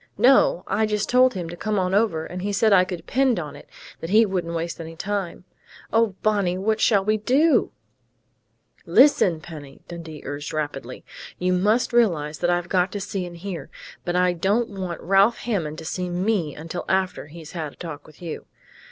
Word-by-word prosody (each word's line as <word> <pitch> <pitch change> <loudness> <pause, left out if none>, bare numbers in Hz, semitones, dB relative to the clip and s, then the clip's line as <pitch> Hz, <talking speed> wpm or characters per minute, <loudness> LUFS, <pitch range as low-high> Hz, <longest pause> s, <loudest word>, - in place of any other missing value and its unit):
"No. 275 - +4
I 220 - +1
just 210 -1 -1
told 255 -1 +4
him 175 -3 -4
to 175 - -6
come 215 +3 -2
on 185 -1 0
over, 195 -7 +1
and 180 0 -6
he 205 +2 -2
said 205 +1 +3
I 185 -1 +6
could 185 - -4
depend 255 +3 +1
on 150 -3 -6
it - - -14 0.3
that 165 - -6
he 220 +3 +6
wouldn't 175 -4 -2
waste 170 +1 -3
any 165 0 -8
time.... 190 -1 -3 0.5
Oh, 225 -3 +3
Bonnie! 200 -4 +1
What 215 +3 0
shall 200 -4 +3
we 215 +1 +2
do?" 275 +9 +3 1.2
"Listen, 225 - +5
Penny!" 150 -4 -11
Dundee 165 -3 -9
urged 145 +2 -5
rapidly. 145 -5 -4 0.3
"You 180 0 +1
must 215 +7 +2
realize 160 -11 +2
that 175 - +1
I've 175 0 0
got 180 0 +1
to 205 - -3
see 195 -2 -4
and 175 -1 -10
hear, 180 -1 -6 0.3
but 175 - -2
I 180 0 +3
don't 200 +7 +1
want 185 -4 -5
Ralph 195 +6 +4
Hammond 170 -10 -2
to - - -8
see 180 +2 -3
me 180 -4 -1
until 165 +3 -6
after 190 -5 0
he's 160 0 -11
had 160 -4 -5
a - - -21
talk 160 -4 -8
with 155 +3 -16
you. 165 -3 -6
180 Hz, 195 wpm, -23 LUFS, 165-210 Hz, 1.2 s, I